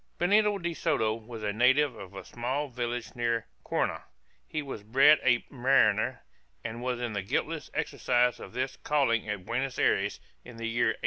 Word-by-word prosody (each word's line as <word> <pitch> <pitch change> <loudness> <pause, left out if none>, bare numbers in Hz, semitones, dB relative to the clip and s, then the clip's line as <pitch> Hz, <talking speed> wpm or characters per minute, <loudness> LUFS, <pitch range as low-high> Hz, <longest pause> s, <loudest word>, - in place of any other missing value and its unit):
Benito 205 +3 +3
de 170 -2 -3
Soto 110 -8 +1
was 115 0 -8
a 105 -1 -1
native 130 +4 +3
of 100 -2 -10
a 95 - -8
small 130 +5 -3
village 120 -1 -4
near 115 -1 0 0.2
Courna; - - -1 0.4
he 155 -1 -3
was 135 -6 -6
bred 135 +8 +5
a 125 -2 +2
mariner, 125 -2 +2 0.4
and 115 +2 -5
was 125 -1 -2
in 120 -2 -3
the 100 - -1
guiltless 95 - -2
exercise 125 0 +1
of - - -10
his 130 +2 -2
calling 125 -8 +1
at 100 -3 -4
Buenos 130 +4 -2
Ayres, - - +1 0.2
in 120 -2 -12
the 115 - -5
year 120 +1 +1
1827. 110 - -1
120 Hz, 180 wpm, -29 LUFS, 115-135 Hz, 0.4 s, bred